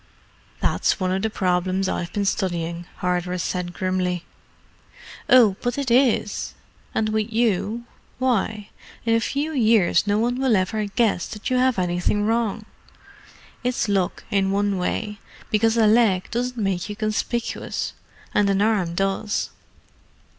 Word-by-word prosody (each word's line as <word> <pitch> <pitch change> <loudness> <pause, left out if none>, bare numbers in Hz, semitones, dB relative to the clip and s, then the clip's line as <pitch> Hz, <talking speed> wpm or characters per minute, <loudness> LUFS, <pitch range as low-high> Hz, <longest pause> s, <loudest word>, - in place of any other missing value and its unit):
"That's - - +1
one 185 -1 0
of 190 +1 0
the 220 - 0
problems 185 -1 0
I've 175 -2 -2
been 205 -1 -1
studying," 175 -3 -2
Hardress 180 0 -1
said 180 -1 -2
grimly. 180 -2 -1 1.0
"Oh, 220 -7 +6
but 245 +1 -1
it 275 -4 -1
is. 240 -4 +2 0.4
And 215 0 +1
with 215 +1 -1
you—why, 225 0 -1 0.4
in 230 - +3
a 230 - +4
few 285 +7 -2
years 220 - +3
no 205 0 +2
one 240 +3 0
will 260 -4 +3
ever 210 +3 0
guess 205 -2 +1
that 215 +2 -5
you 255 - +3
have 255 -2 +3
anything 180 +3 0
wrong. 225 -1 0 1.0
It's 250 -2 0
luck 195 -3 0
in 195 -2 +2
one 200 -1 +1
way, 210 +3 -2 0.3
because 225 +2 +3
a 225 - +5
leg 210 -4 +3
doesn't 245 +1 -2
make 195 -3 -1
you 205 - -4
conspicuous, 220 +2 -2 0.4
and 205 -1 +3
an 195 0 +2
arm 200 -5 +1
does." 195 +2 -1
210 Hz, 140 wpm, -23 LUFS, 185-230 Hz, 1.0 s, Oh